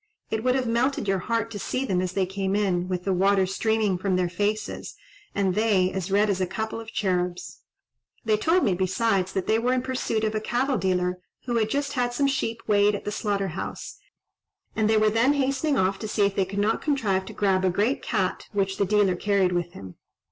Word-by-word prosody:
It 220 0 -1
would 255 0 +2
have 260 -1 0
melted 235 +1 0
your 195 -1 +1
heart 230 +3 -1
to 205 - -5
see 255 +7 -2
them 185 -7 0
as 185 0 -3
they 195 -1 +1
came 190 +1 -2
in, 185 -4 0
with 180 -1 -3
the 195 - 0
water 195 +1 +3
streaming 210 0 0
from 190 0 0
their 180 -1 +1
faces, 205 +4 -3 0.4
and 195 -2 +1
they 200 -3 +2
as 190 -1 -4
red 205 +2 +3
as 195 -2 0
a 185 - +1
couple 220 +4 -4
of 225 -1 -9
cherubs. 180 -3 -2 0.7
They 215 -1 +3
told 330 +11 +2
me, 195 - +2
besides, 190 +1 0
that 190 - -1
they 220 +1 +2
were 245 +2 +1
in 255 -1 0
pursuit 255 -4 -2
of 215 0 0
a 215 - -1
cattle 255 +4 0
dealer, 180 -1 0 0.3
who 240 -2 0
had 220 -1 +1
just 280 +2 -1
had 245 -2 0
some 280 - +2
sheep 230 -4 -1
weighed 205 -1 +3
at - - -7
the 210 - -2
slaughter 200 -2 -1
house, 165 - -6 0.8
and 215 -1 +1
they 220 - +4
were 215 0 +3
then 235 +6 +3
hastening 275 +1 0
off 190 +1 +1
to 215 - -4
see 210 -1 +2
if 200 -1 -1
they 195 - +2
could 195 +2 -7
not 210 +2 +1
contrive 215 -11 0
to - - -9
grab 190 -2 +1
a 185 - +3
great 210 +9 0
cat - - -2
which 195 -1 0
the 200 - +2
dealer 200 -2 +3
carried 195 -1 +1
with 175 -1 -2
him. 95 -2 -10
205 Hz, 225 wpm, -25 LUFS, 190-225 Hz, 0.8 s, they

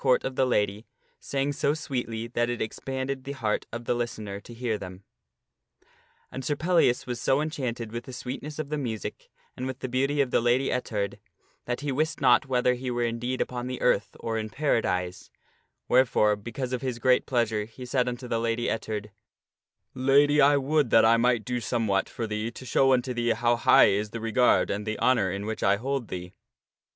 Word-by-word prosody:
rt 130 -2 +3
of 130 - -3
the 130 - +2
lady 105 -2 0 0.3
sang 140 +1 -1
so 145 +1 +1
sweetly 120 -7 -3
that 120 0 -1
it 120 - -2
expanded 130 +4 -4
the 140 +1 -5
heart 110 -6 -2
of 120 +1 -6
the - - +1
listener 110 -4 -4
to 110 - -14
hear 120 -1 -2
them. 95 -1 -8 1.3
And 130 - -6
Sir 145 +3 0
Pellias 165 -6 +2
was 120 -2 -4
so 135 +1 +2
enchanted 125 -7 -3
with 120 +1 -5
the - - -8
sweetness 135 +4 -6
of 155 -2 -4
the 150 0 -2
music, 110 -7 -5 0.3
and 130 - -4
with 130 -1 -4
the - - -2
beauty 135 +3 0
of 135 -3 +2
the - - +3
Lady 120 +3 +2
Ettard, 105 -5 -2 0.5
that 125 +2 -3
he 145 -1 -2
wist 155 +4 -1
not 125 -1 +4
whether 125 -1 +2
he 125 +1 -4
were 120 -1 -1
indeed 120 +2 -2
upon 125 0 -3
the 130 -1 -4
earth - - +1
or 115 -1 -2
in 110 0 -4
Paradise, 90 -10 -1 0.6
wherefore, 120 -4 +4
because 120 +5 -5
of 125 - -2
his 130 -3 -3
great 125 +1 +3
pleasure, 115 -4 0
he 115 +3 -10
said 125 0 +1
unto 125 +1 -6
the 115 -1 0
Lady 115 +1 0
Ettard, 105 -1 -4 0.5
" - - -57 0.2
Lady, 145 +2 +5
I 145 +1 +6
would 140 -1 +1
that 115 - +6
I 115 +1 +5
might 120 -2 +2
do 125 0 -1
somewhat 110 -4 0
for 115 - -4
thee 105 +1 -3
to 125 +2 -11
show 135 +1 +3
unto 125 0 0
thee 120 -1 +1
how 120 +1 +2
high 115 - +6
is 105 +2 0
the 115 - -6
regard 115 +2 +3
and 105 +2 -3
the 110 -1 -2
honor 120 -7 +3
in 100 +2 -4
which 110 0 -4
I 100 +1 +4
hold 130 +2 -3
thee." 90 0 -7
120 Hz, 205 wpm, -27 LUFS, 110-130 Hz, 1.3 s, I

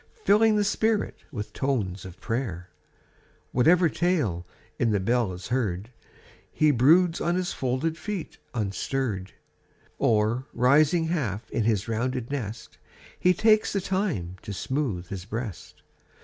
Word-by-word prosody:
Filling 215 +1 +5
the 210 - +3
spirit 215 +1 0
with 105 -6 -6
tones 105 -10 -1
of 95 0 -10
prayer 110 -7 -3 0.8
Whatever 170 +8 +5
tale 145 - 0 0.3
in 115 - +2
the 105 -2 +2
bell 115 +1 +1
is 90 0 -8
heard, 110 -4 -1 0.7
lie 155 -1 +6
broods 165 +7 +4
on 170 +1 +1
his 185 -1 -1
folded 135 +6 -1
feet 190 +1 -5 0.2
unstirr'd, 105 -1 -2 0.7
Oi, 110 +1 +3
rising 145 +7 +4
half 120 - -2
in 115 - 0
his 110 -3 +1
rounded 120 +2 -2
nest. 115 -5 -5 0.4
He 180 0 +4
takes 215 +2 +3
the 200 - +1
time 185 - -2
to 100 - -6
smooth 110 -6 -2
his 95 -2 -6
breast. 110 -2 -6
125 Hz, 135 wpm, -26 LUFS, 105-165 Hz, 0.8 s, lie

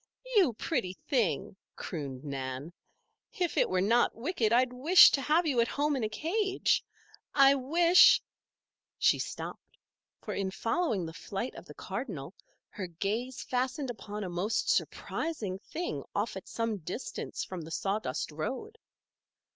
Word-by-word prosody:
"You 360 - +5
pretty 220 - -2
thing!" 210 - 0 0.2
crooned 140 -6 -6
Nan. 135 +2 -5 0.6
"If 355 -3 0
it - - +3
were 185 0 +1
not 230 +5 +3
wicked 230 -3 0
I'd 250 +1 +3
wish 315 +9 +8
to 275 - +1
have 310 +6 +2
you 265 -6 +2
at 230 - +2
home 290 +3 0
in 255 - -2
a 215 - 0
cage. 380 - 0 0.5
I 275 -1 +7
wish 335 +7 +6 0.4
" - - -64 0.3
She - - +3
stopped, - - -7 0.4
for - - -5
in 195 -1 -1
following 225 - -1
the 160 - -7
flight 195 +8 -5
of - - -11
the - - -12
cardinal 190 - -5 0.4
her 190 -3 -6
gaze 215 +9 -3
fastened 255 +1 -1
upon 210 -2 -6
a - - -3
most 185 +6 -1
surprising 215 - -2
thing 345 - -4
off - - -1
at - - -8
some 230 -2 -2
distance 180 +9 -5
from 185 -2 -6
the 160 - -9
sawdust 195 -6 -2
road. 265 - -5
230 Hz, 150 wpm, -30 LUFS, 185-285 Hz, 0.6 s, wish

